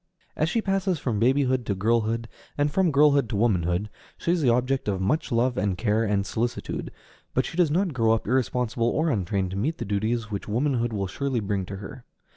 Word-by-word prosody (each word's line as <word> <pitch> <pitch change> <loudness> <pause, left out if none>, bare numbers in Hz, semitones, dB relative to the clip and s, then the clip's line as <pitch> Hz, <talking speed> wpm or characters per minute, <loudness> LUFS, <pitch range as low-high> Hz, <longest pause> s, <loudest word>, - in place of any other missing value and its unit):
As 155 - +1
she 225 +4 0
passes 195 -2 0
from 120 -7 -2
babyhood 130 +1 +2
to 100 - 0
girlhood, 115 +3 0 0.3
and 145 0 +1
from 185 +2 +2
girlhood 140 -3 +4
to - - -2
womanhood, 95 -3 +1 0.3
she 170 - -1
is 175 -1 +1
the 130 - +3
object 125 +2 +1
of 100 -2 0
much 145 - 0
love 120 +1 +1
and 100 -2 0
care 110 +1 +1
and 100 -2 0
solicitude; 115 +4 -3 0.5
but - - +2
she - - -6
does 175 -3 +3
not 175 +2 +1
grow 115 -3 +2
up 115 - -1
irresponsible 120 -1 0
or 155 +5 +1
untrained 95 -3 -1
to 95 - -4
meet 150 +11 -1
the 120 - -4
duties 110 +2 -1
which 100 - -4
womanhood 120 +1 0
will 100 -3 -2
surely 130 +6 -2
bring 100 -3 -2
to 100 - -6
her. 105 +6 -9
120 Hz, 210 wpm, -25 LUFS, 105-140 Hz, 0.5 s, girlhood